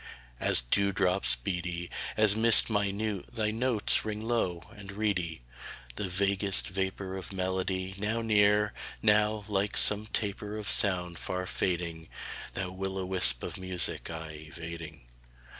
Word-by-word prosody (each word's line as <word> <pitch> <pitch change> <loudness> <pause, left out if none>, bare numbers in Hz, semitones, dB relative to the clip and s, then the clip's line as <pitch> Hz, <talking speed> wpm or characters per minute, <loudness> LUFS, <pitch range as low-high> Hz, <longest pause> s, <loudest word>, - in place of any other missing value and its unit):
III - - 0
As - - +7
dew 100 +12 +1
drops 90 -9 +1
beady, 85 +5 -4 0.3
As 110 -2 +4
mist 115 0 +7
minute, 105 -1 -1
thy 110 -2 0
notes 115 -1 +1
ring 105 -1 -4
low 110 -7 -1
and 100 -1 -10
reedy: 90 - -2 0.5
The 105 - -3
vaguest 100 +1 0
vapor 95 0 -3
Of 95 0 -7
melody, 95 0 -2
now 110 +3 -1
near; 105 -1 +3 0.3
now, 105 -1 +3
like 100 -1 -1
some 105 +1 +6
taper 105 0 -3
Of 105 -1 -6
sound, 90 -7 +4
far 90 0 -3
fading 85 -3 -2 0.5
Thou 95 -1 -2
will 95 +1 -4
o' 95 - -3
wisp 60 -11 +1
of - - -5
music 95 -1 -3
aye 80 -2 -8
evading. 80 -3 -9
95 Hz, 140 wpm, -29 LUFS, 90-105 Hz, 0.5 s, As